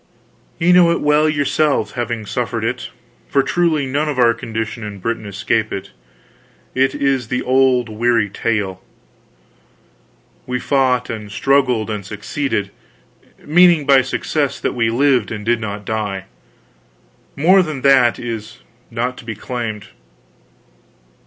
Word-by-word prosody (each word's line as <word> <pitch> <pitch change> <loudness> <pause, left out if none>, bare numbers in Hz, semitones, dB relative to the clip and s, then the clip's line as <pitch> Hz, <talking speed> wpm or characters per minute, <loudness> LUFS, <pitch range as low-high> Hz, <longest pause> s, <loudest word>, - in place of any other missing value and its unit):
"Ye 175 +1 +3
know 180 -1 +6
it 170 - +1
well 150 +1 +3
yourselves, 150 0 +1
having 120 -2 -3
suffered 115 0 -3
it 120 +2 -3 0.4
for 140 -1 +2
truly 160 -1 +1
none 145 +4 -1
of 145 - -3
our 120 -2 +5
condition 115 0 -5
in 105 -1 -6
Britain 110 +2 -3
escape 105 +2 -1
it. 95 - -6 0.8
It 135 +1 +1
is 135 -4 0
the 125 +2 -2
old, 130 -1 +3
weary 115 0 +1
tale. 100 -3 -2 1.7
We 125 0 -2
fought 125 -2 +1
and 105 -2 -7
struggled 125 -2 +1
and 105 -2 -4
succeeded; 105 +1 -3 0.7
meaning 170 -1 +5
by 135 -1 +6
success, 140 +1 -2
that - - -2
we 115 -2 +1
lived 125 -1 +2
and 105 -2 -5
did 120 0 +2
not 105 -1 -5
die; 100 -3 -3 1.1
more 185 +7 +5
than 155 -6 -4
that 135 -4 +5
is 115 -3 -6 0.3
not 120 +2 -3
to - - -11
be 115 -2 -5
claimed. 110 -2 -5
120 Hz, 135 wpm, -18 LUFS, 110-140 Hz, 1.7 s, know